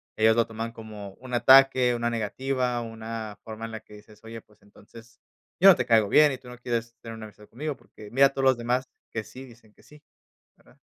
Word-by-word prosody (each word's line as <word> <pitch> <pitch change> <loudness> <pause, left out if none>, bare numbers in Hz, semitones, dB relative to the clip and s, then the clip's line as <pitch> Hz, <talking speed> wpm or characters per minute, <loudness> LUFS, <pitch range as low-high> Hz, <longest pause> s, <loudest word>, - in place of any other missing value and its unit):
ellos 110 +1 +3
lo 115 0 +2
toman 115 +1 -6
como 105 -3 -10
un 125 0 -12
ataque, 130 0 +5
una 120 0 -1
negativa, 125 +2 -2
una 115 -2 -7
forma 110 0 -8
en 115 - -8
la 110 0 -7
que - - -19
dices: 105 0 -18
"Oye, 115 0 -9
pues, 105 -1 -28
entonces, 115 +2 -17 0.4
yo 195 +3 +8
no 190 - +8
te 125 - -2
caigo 110 -3 +3
bien 150 +4 +5
y 130 - -5
tú 125 0 -18
no 125 - -11
quieres 115 -1 -4
tener 115 -1 -9
una 110 -1 -9
amistad 105 0 -16
conmigo, 145 +5 -5
porque 105 - -15
mira, 135 +3 +5
todos 135 0 -4
los 130 -2 +4
demás 125 +2 -2 0.2
que 115 - -4
sí 130 +4 -12
dicen 115 -4 -19
que - - -24
sí, 150 0 -18 0.6
¿verdad?". - - -24
115 Hz, 225 wpm, -26 LUFS, 110-125 Hz, 0.6 s, yo